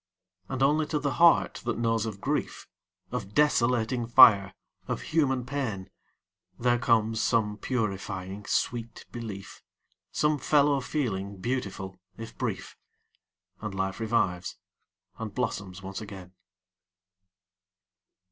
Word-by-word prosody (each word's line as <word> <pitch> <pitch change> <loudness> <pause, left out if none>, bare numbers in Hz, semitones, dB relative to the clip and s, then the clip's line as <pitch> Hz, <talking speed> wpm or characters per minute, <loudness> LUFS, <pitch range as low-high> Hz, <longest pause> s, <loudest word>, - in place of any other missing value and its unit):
And 135 0 -1
only 150 +2 +3
to 155 - -1
the 145 -1 -1
heart 170 -1 +5
that 120 0 -2
knows 115 -1 +1
of 100 -3 -6
grief, - - -2 0.4
Of 100 - -5
desolating 125 -4 +2
fire, 105 -6 +7 0.3
of - - -2
human 135 -6 +2
pain, 110 -9 -4 0.7
There 120 0 +2
comes 115 -3 +2
some 105 -3 +1
purifying 100 -4 -3
sweet 115 -1 -2
belief, 105 -5 -7 0.5
Some 150 -1 +1
fellow 145 0 +3
feeling 100 -9 -2
beautiful, 95 -4 -4 0.2
if 115 0 -8
brief. - - -4 0.9
And 105 -3 -5
life 95 +1 -2
revives, 105 -6 0 0.6
and 110 -3 -6
blossoms 95 -7 -3
once 95 +2 -6
again. 95 -3 -10
115 Hz, 110 wpm, -28 LUFS, 100-125 Hz, 0.9 s, fire